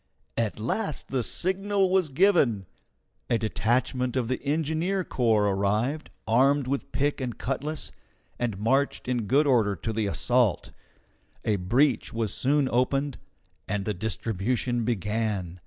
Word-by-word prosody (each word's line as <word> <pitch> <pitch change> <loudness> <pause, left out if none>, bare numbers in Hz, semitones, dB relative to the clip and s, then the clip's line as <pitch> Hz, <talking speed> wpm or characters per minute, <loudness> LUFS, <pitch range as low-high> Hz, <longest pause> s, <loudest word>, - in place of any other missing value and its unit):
At 110 -2 -1
last 155 - -2
the 130 -2 0
signal 190 - 0
was 185 -4 +2
given. 135 - +3 0.6
A 120 - +3
detachment 120 +3 0
of 125 -3 0
the 130 - -1
engineer 160 +6 0
corps 115 -8 +2
arrived, 105 +10 0 0.2
armed 135 +5 +3
with 135 +2 -3
pick 140 +2 0
and 125 -3 -4
cutlass, 145 +4 -3 0.5
and 115 -5 -1
marched 135 +8 0
in 120 -4 -1
good 140 +6 +4
order 115 -7 +3
to 110 +6 -4
the 110 -1 0
assault. 120 +1 +1 0.7
A 105 -2 +2
breach 120 +8 +1
was 110 -3 -1
soon 140 +1 +2
opened, 135 +3 0 0.5
and 105 -2 -2
the 105 - 0
distribution 110 +4 -1
began. 105 -5 -2
125 Hz, 135 wpm, -27 LUFS, 110-140 Hz, 0.7 s, good